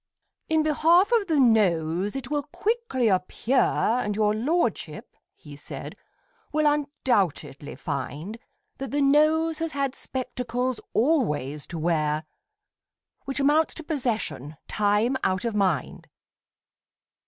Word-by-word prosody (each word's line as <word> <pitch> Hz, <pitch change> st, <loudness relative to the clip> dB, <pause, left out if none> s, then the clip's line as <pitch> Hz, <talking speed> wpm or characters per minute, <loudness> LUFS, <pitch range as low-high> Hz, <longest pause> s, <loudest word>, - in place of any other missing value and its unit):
In 315 Hz, -1 st, +3 dB
behalf 330 Hz, +6 st, +4 dB
of 450 Hz, -4 st, +3 dB
the 315 Hz, -4 st, +2 dB
Nose 195 Hz, -5 st, +2 dB
it 270 Hz, 0 st, -6 dB
will 295 Hz, -1 st, +1 dB
quickly 355 Hz, -, -1 dB
appear, 205 Hz, +6 st, +1 dB
And 220 Hz, -3 st, +1 dB
your 210 Hz, 0 st, +2 dB
lordship, 300 Hz, +11 st, -2 dB, 0.2 s
he 145 Hz, -2 st, -12 dB
said, 145 Hz, -, -7 dB, 0.6 s
will 305 Hz, 0 st, +1 dB
undoubtedly 205 Hz, -, 0 dB
find, 150 Hz, -, -5 dB, 0.4 s
That 270 Hz, -, -4 dB
the 290 Hz, +1 st, 0 dB
Nose 310 Hz, +3 st, +3 dB
has 330 Hz, -1 st, -3 dB
had 275 Hz, -2 st, -1 dB
spectacles 250 Hz, -1 st, -3 dB
always 150 Hz, -, 0 dB
to 170 Hz, -, -6 dB
wear, 155 Hz, -2 st, 0 dB, 1.0 s
Which 270 Hz, +1 st, -3 dB
amounts 295 Hz, +3 st, +3 dB
to 325 Hz, -, -7 dB
possession 225 Hz, -, -3 dB
time 210 Hz, +5 st, +1 dB
out 185 Hz, +3 st, 0 dB
of 230 Hz, -, -1 dB
mind. 185 Hz, -10 st, -1 dB
245 Hz, 120 wpm, -25 LUFS, 185-295 Hz, 1.0 s, behalf